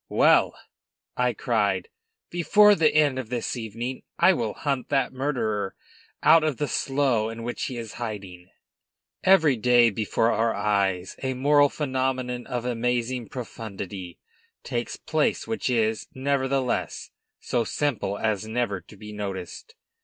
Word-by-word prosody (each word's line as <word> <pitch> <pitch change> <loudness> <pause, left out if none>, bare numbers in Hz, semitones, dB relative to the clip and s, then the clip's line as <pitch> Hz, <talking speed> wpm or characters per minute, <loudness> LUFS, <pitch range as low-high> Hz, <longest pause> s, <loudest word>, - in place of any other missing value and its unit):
"Well," - - +4 0.6
I 125 -1 +1
cried, 105 -8 0 0.4
"before 210 +5 +5
the 160 -6 +3
end 145 -4 +3
of 120 -4 -6
this 120 0 -2
evening, 120 +2 -5 0.2
I 185 +3 +6
will 115 -9 -2
hunt 140 -3 -2
that 135 -2 +1
murderer 120 -7 -2 0.5
out 160 +1 +7
of 155 -5 0
the 150 - -1
slough 135 -7 0
in 115 0 -7
which 120 +1 -3
he 130 - -5
is 115 -2 -6
hiding." 95 -5 -6 0.7
Every 165 -7 +5
day, 120 0 +4
before 110 +2 +1
our 115 0 +1
eyes, 95 -3 0
a 130 -1 -2
moral 145 +2 +4
phenomenon 130 -3 -2
of 120 -1 -3
amazing 120 0 -1
profundity 100 -7 -7 0.5
takes - - -3
place - - 0
which 225 -11 -2
is, 110 -3 0
nevertheless, 135 -1 -1 0.3
so 120 -2 0
simple 115 -5 -1
as 110 -1 -1
never 110 -4 -1
to 100 +5 -16
be 105 +1 -9
noticed. 100 - -6
120 Hz, 140 wpm, -25 LUFS, 110-135 Hz, 0.7 s, out